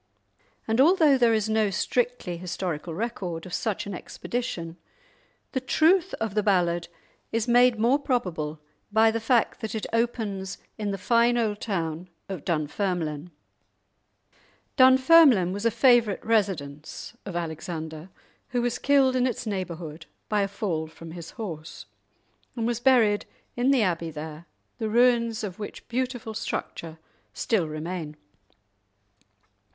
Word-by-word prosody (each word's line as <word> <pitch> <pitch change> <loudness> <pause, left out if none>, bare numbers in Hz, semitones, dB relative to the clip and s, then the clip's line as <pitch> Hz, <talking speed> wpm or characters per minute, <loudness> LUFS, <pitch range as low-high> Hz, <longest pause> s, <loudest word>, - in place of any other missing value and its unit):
And 225 +3 +3
although 315 -2 +5
there 240 -3 +4
is 215 -1 0
no 220 -1 +2
strictly 235 -1 -1
historical 175 -2 -4
record 185 -6 -4
of 180 - -9
such 220 -4 -2
an 200 - -5
expedition, 175 -5 -5 0.7
the 260 - 0
truth 335 +8 +3
of 225 -3 -3
the 210 - +2
ballad 175 -4 +1 0.4
is 225 0 0
made 245 0 +5
more 240 +6 +3
probable 175 - -2 0.3
by 220 +1 +5
the 230 - -1
fact 230 +1 +1
that 220 0 -4
it 220 - -3
opens 215 -5 -1 0.2
in 210 -2 -3
the 200 - -2
fine 235 +4 +3
old 215 -3 0
town 170 -4 -3 0.2
of 185 -6 -5
Dunfermline. 165 -1 -2 1.5
Dunfermline 260 - +6
was 205 +3 0
a - - +4
favourite 235 -4 +3
residence 185 -7 -2
of 195 - -7
Alexander, 160 0 -5 0.4
who 245 -2 0
was 240 0 -1
killed 270 -2 +4
in 255 0 +3
its 245 0 -3
neighbourhood 170 -6 -5 0.2
by 210 -1 +2
a 200 - +1
fall 175 -6 -3
from 160 +1 -11
his 170 0 -8
horse, 165 -9 -7 0.7
and 230 -2 -2
was 235 -1 0
buried 240 -5 +3 0.3
in 245 +2 +1
the 270 -5 +4
abbey 170 -3 -1
there, 155 +1 -8 0.3
the 220 -2 -1
ruins 235 -1 +3
of 190 -2 -5
which 205 - -8
beautiful 245 -2 -3
structure 165 -6 -5 0.4
still 195 -8 0
remain. 155 0 -5
210 Hz, 135 wpm, -26 LUFS, 170-240 Hz, 1.5 s, Dunfermline